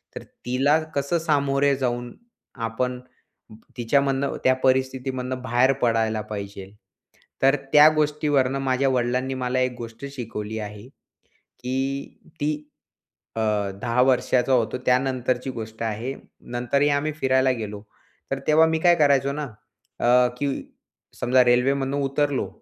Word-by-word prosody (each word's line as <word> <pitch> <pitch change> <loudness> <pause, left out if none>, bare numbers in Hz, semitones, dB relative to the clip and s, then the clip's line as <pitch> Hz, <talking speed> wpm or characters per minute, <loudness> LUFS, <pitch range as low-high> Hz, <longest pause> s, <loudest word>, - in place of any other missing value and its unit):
तर - - -7 0.2
तिला 135 +5 +2 0.2
कसं 140 +5 0
सामोरे 140 -3 +2
जाऊन 120 -2 -2 0.5
आपण 125 +3 -2 0.8
तिच्यामधनं, 135 +3 +1
त्या 130 - +5
परिस्थितीमधनं 130 -1 0
बाहेर 125 +2 +3
पडायला 110 -2 +1
पाहिजे. 100 -2 -6 0.7
तर 135 +1 +5 0.2
त्या 150 +1 +9
गोष्टीवरनं 145 -3 +1
माझ्या 135 0 +1
वडिलांनी 125 +1 0
मला 130 0 -1
एक 130 -1 0
गोष्ट 115 +2 -8
शिकवली 110 -4 -5
आहे. 105 +2 -8
की 135 0 -7 0.2
ती 150 +1 +1 0.8
अ, 115 - -1 0.4
10 120 +1 +1
वर्षाचा 130 0 +2
होतो 115 -1 +1
त्यानंतरची 125 0 +1
गोष्ट 110 -1 -8
आहे. 115 +4 -3 0.4
नंतरही 140 +4 +1
आम्ही 145 +2 0
फिरायला 130 -2 +2
गेलो 105 -1 -6 0.5
तर 135 - -1
तेव्हा 155 +1 +6
मी 160 0 0
काय 175 -1 +5
करायचो 140 -3 +3
ना 150 +1 -4 0.6
अ, 125 +1 +4
की 145 - 0 0.7
समजा 125 +1 +4
रेल्वेमधून 135 +3 +2
उतरलो, 140 0 0
130 Hz, 120 wpm, -24 LUFS, 120-140 Hz, 0.8 s, त्या